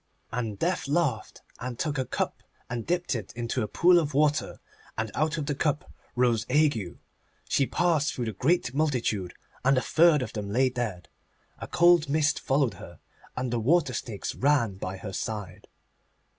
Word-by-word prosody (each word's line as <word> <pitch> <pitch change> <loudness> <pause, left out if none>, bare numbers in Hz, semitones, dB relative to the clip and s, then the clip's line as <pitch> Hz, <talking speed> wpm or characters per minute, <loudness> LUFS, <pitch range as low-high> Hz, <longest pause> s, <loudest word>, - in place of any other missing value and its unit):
And 115 -4 -3
Death 175 - -1
laughed, 145 -7 -1 0.2
and 125 -1 -5
took 150 -1 -2
a 130 - 0
cup, - - -3 0.3
and 120 -2 -4
dipped 175 -4 0
it 110 -6 -5
into 115 0 -2
a 105 - -1
pool 175 +7 +5
of 150 -4 -3
water, 150 +1 +1 0.4
and 110 -1 -2
out 155 +2 0
of 150 - -2
the 145 - -1
cup 145 +1 -1 0.2
rose 120 -2 +2
Ague. 130 - +1 0.5
She 135 - +2
passed 165 -4 +1
through 125 - -2
the 110 - -3
great 150 - +1
multitude, 125 - -1 0.3
and 135 +1 +4
a - - +3
third 160 -4 +4
of - - -7
them 105 -2 -4
lay 130 +5 +3
dead. 115 -9 -4 0.5
A - - -6
cold 175 -3 +4
mist 150 0 +2
followed 135 -4 +1
her, 85 -1 -11 0.4
and 125 -1 -2
the 120 - +1
water 145 +3 +2
snakes 110 -4 -4
ran 135 -7 +2
by 95 0 -5
her 95 0 -7
side. 105 -2 -5
130 Hz, 175 wpm, -27 LUFS, 110-150 Hz, 0.5 s, pool